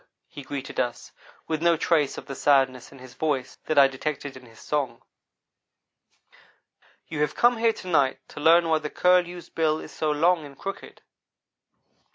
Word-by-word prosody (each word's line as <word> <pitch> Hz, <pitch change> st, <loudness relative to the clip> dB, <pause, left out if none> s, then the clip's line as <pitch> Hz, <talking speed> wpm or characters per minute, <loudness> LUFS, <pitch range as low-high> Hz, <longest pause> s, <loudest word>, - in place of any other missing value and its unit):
he 145 Hz, -, -10 dB
greeted 135 Hz, 0 st, -6 dB
us, 120 Hz, -1 st, -3 dB, 0.4 s
with 160 Hz, -1 st, -2 dB
no 170 Hz, -1 st, +3 dB
trace 150 Hz, -3 st, +1 dB
of -, -, -8 dB
the 135 Hz, -, -7 dB
sadness 135 Hz, -3 st, +2 dB
in 140 Hz, -, -14 dB
his 130 Hz, -1 st, -13 dB
voice 145 Hz, -5 st, -2 dB
that 155 Hz, -, -1 dB
I 140 Hz, -1 st, +8 dB
detected 140 Hz, +1 st, -5 dB
in 130 Hz, -1 st, -13 dB
his 115 Hz, -1 st, -18 dB
song. 140 Hz, -6 st, -3 dB, 2.0 s
"You 150 Hz, -2 st, -4 dB
have 150 Hz, -, 0 dB
come 240 Hz, 0 st, +4 dB
here 225 Hz, 0 st, +2 dB
to 185 Hz, -, -11 dB
night 140 Hz, -7 st, +2 dB
to -, -, -10 dB
learn 165 Hz, +3 st, +5 dB
why 160 Hz, -1 st, +2 dB
the 150 Hz, -1 st, -5 dB
Curlew's 180 Hz, 0 st, +1 dB
bill 155 Hz, -1 st, +1 dB
is -, -, -10 dB
so 155 Hz, -, -2 dB
long 165 Hz, +3 st, +2 dB
and 140 Hz, -2 st, -12 dB
crooked. 195 Hz, 0 st, -8 dB
150 Hz, 175 wpm, -25 LUFS, 135-165 Hz, 2.0 s, I